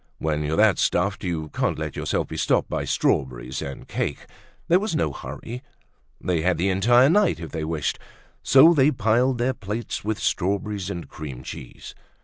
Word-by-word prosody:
When 75 Hz, -1 st, -1 dB
you're 75 Hz, +2 st, -1 dB
that 105 Hz, -2 st, +4 dB
stuffed, 100 Hz, +4 st, +1 dB
you 80 Hz, -4 st, -3 dB
can't -, -, -1 dB
let -, -, -4 dB
yourself -, -, -1 dB
be -, -, -6 dB
stopped -, -, +1 dB
by -, -, -3 dB
strawberries 65 Hz, 0 st, -1 dB
and 70 Hz, -, -7 dB
cake. -, -, -3 dB, 0.4 s
There 175 Hz, +2 st, +5 dB
was 210 Hz, -3 st, -2 dB
no 75 Hz, -, 0 dB
hurry. 120 Hz, -, -7 dB, 0.6 s
They 85 Hz, -3 st, 0 dB
had 90 Hz, 0 st, +1 dB
the 95 Hz, +4 st, +1 dB
entire 120 Hz, +7 st, +5 dB
night 200 Hz, -, +3 dB
if 80 Hz, -, -7 dB
they 80 Hz, -2 st, -3 dB
wished. 80 Hz, -2 st, -2 dB, 0.4 s
So 150 Hz, +6 st, +7 dB
they 140 Hz, -2 st, +4 dB
piled 125 Hz, 0 st, +2 dB
their 125 Hz, +2 st, +1 dB
plates 110 Hz, 0 st, -5 dB
with 110 Hz, +1 st, -1 dB
strawberries 100 Hz, +1 st, -1 dB
and 85 Hz, -4 st, -5 dB
cream 70 Hz, -5 st, -8 dB
cheese. 60 Hz, -, -9 dB
95 Hz, 175 wpm, -24 LUFS, 80-120 Hz, 0.6 s, So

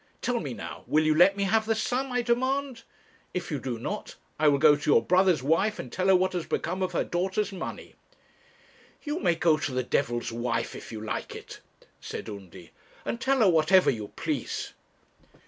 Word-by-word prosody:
Tell 245 Hz, -1 st, -1 dB
me 140 Hz, -, -5 dB
now; -, -, -8 dB
will 155 Hz, +1 st, +3 dB
you 155 Hz, -, +4 dB
let 180 Hz, +5 st, +5 dB
me 200 Hz, -, 0 dB
have 220 Hz, +2 st, +2 dB
the 225 Hz, -, +2 dB
sum 250 Hz, +4 st, -1 dB
I 245 Hz, -1 st, 0 dB
demand? 260 Hz, +1 st, 0 dB, 0.5 s
If 180 Hz, -1 st, -3 dB
you 145 Hz, -, -1 dB
do 125 Hz, -2 st, -4 dB
not, 115 Hz, -, -5 dB, 0.2 s
I 155 Hz, -, +4 dB
will 145 Hz, -1 st, +5 dB
go 150 Hz, +1 st, +6 dB
to 145 Hz, -, -3 dB
your -, -, +5 dB
brother's 180 Hz, -6 st, +3 dB
wife 180 Hz, +9 st, +2 dB
and 125 Hz, -, -7 dB
tell 185 Hz, 0 st, -1 dB
her 190 Hz, -, +6 dB
what 185 Hz, +1 st, +2 dB
has 175 Hz, -3 st, -3 dB
become 185 Hz, +3 st, -2 dB
of 185 Hz, -1 st, -1 dB
her -, -, +1 dB
daughter's 190 Hz, +4 st, -1 dB
money.' 190 Hz, -, -7 dB, 1.1 s
'You 300 Hz, +2 st, -2 dB
may 170 Hz, -, +2 dB
go 160 Hz, -2 st, +3 dB
to 145 Hz, -, -3 dB
the 130 Hz, 0 st, -1 dB
devil's 120 Hz, -2 st, -1 dB
wife 120 Hz, +1 st, -2 dB
if -, -, -9 dB
you 110 Hz, -2 st, -6 dB
like 110 Hz, -, -4 dB
it,' -, -, -10 dB, 0.4 s
said -, -, -7 dB
Undy, 95 Hz, -4 st, -10 dB, 0.3 s
'and 235 Hz, -, -3 dB
tell 270 Hz, -1 st, +2 dB
her 205 Hz, -, +6 dB
whatever 175 Hz, +3 st, +5 dB
you 110 Hz, -5 st, -5 dB
please.' -, -, -3 dB
180 Hz, 200 wpm, -27 LUFS, 140-215 Hz, 1.1 s, go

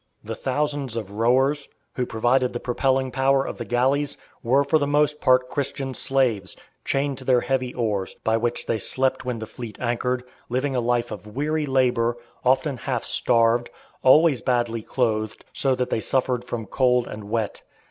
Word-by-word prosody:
The -, -, -5 dB
thousands 145 Hz, -2 st, -2 dB
of 105 Hz, -4 st, -4 dB
rowers, 130 Hz, +7 st, +2 dB, 0.2 s
who 125 Hz, -1 st, -2 dB
provided 120 Hz, +3 st, +1 dB
the 120 Hz, -, -3 dB
propelling 130 Hz, +1 st, 0 dB
power 135 Hz, +1 st, +2 dB
of -, -, -6 dB
the -, -, -4 dB
galleys, 135 Hz, +4 st, +1 dB, 0.2 s
were 135 Hz, +4 st, +3 dB
for 155 Hz, +3 st, +2 dB
the 145 Hz, -, 0 dB
most 150 Hz, +1 st, +2 dB
part 130 Hz, 0 st, +4 dB
Christian 135 Hz, -1 st, -3 dB
slaves, 120 Hz, -10 st, 0 dB, 0.3 s
chained 135 Hz, -1 st, -1 dB
to -, -, -10 dB
their 125 Hz, -1 st, +3 dB
heavy 130 Hz, 0 st, -1 dB
oars, 105 Hz, -6 st, -1 dB
by 110 Hz, -, +2 dB
which 120 Hz, +1 st, -1 dB
they 110 Hz, -, -1 dB
slept 130 Hz, +5 st, -1 dB
when 125 Hz, -2 st, -2 dB
the 110 Hz, -, -5 dB
fleet 110 Hz, -1 st, -8 dB
anchored, 125 Hz, +1 st, -1 dB, 0.3 s
living 130 Hz, +3 st, -1 dB
a 125 Hz, -, +1 dB
life 120 Hz, 0 st, 0 dB
of 105 Hz, 0 st, -7 dB
weary 150 Hz, +2 st, 0 dB
labour, 125 Hz, -3 st, +2 dB, 0.3 s
often 130 Hz, +2 st, +2 dB
half -, -, -2 dB
starved, 115 Hz, +1 st, +2 dB, 0.3 s
always 145 Hz, +1 st, +5 dB
badly 120 Hz, -3 st, 0 dB
clothed, 110 Hz, -3 st, -1 dB
so 135 Hz, -2 st, +1 dB
that 125 Hz, 0 st, -2 dB
they 110 Hz, -, 0 dB
suffered 125 Hz, -1 st, 0 dB
from 120 Hz, -2 st, -4 dB
cold 125 Hz, +2 st, +2 dB
and 105 Hz, -1 st, -7 dB
wet. 110 Hz, 0 st, -2 dB
125 Hz, 175 wpm, -24 LUFS, 115-135 Hz, 0.3 s, always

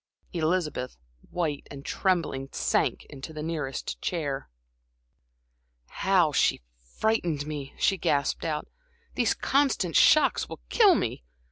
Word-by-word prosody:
Elizabeth, 155 Hz, -6 st, -1 dB, 0.3 s
white 155 Hz, -5 st, -2 dB
and 140 Hz, -1 st, -10 dB
trembling, 165 Hz, -8 st, 0 dB
sank -, -, 0 dB
into 135 Hz, +3 st, -8 dB
the 155 Hz, -1 st, -5 dB
nearest 150 Hz, -5 st, -4 dB
chair. 145 Hz, -6 st, -3 dB, 1.4 s
"How 185 Hz, -5 st, +2 dB
she 135 Hz, -, +2 dB, 0.3 s
frightened 175 Hz, -10 st, 0 dB
me!" 145 Hz, -3 st, -6 dB
she 195 Hz, -2 st, +2 dB
gasped 140 Hz, -2 st, 0 dB
out. 155 Hz, -2 st, -2 dB, 0.5 s
"These -, -, +1 dB
constant 265 Hz, -, +1 dB
shocks 310 Hz, -, +5 dB
will -, -, -8 dB
kill 415 Hz, -6 st, +6 dB
me. 110 Hz, -, -2 dB
155 Hz, 115 wpm, -27 LUFS, 140-185 Hz, 1.4 s, kill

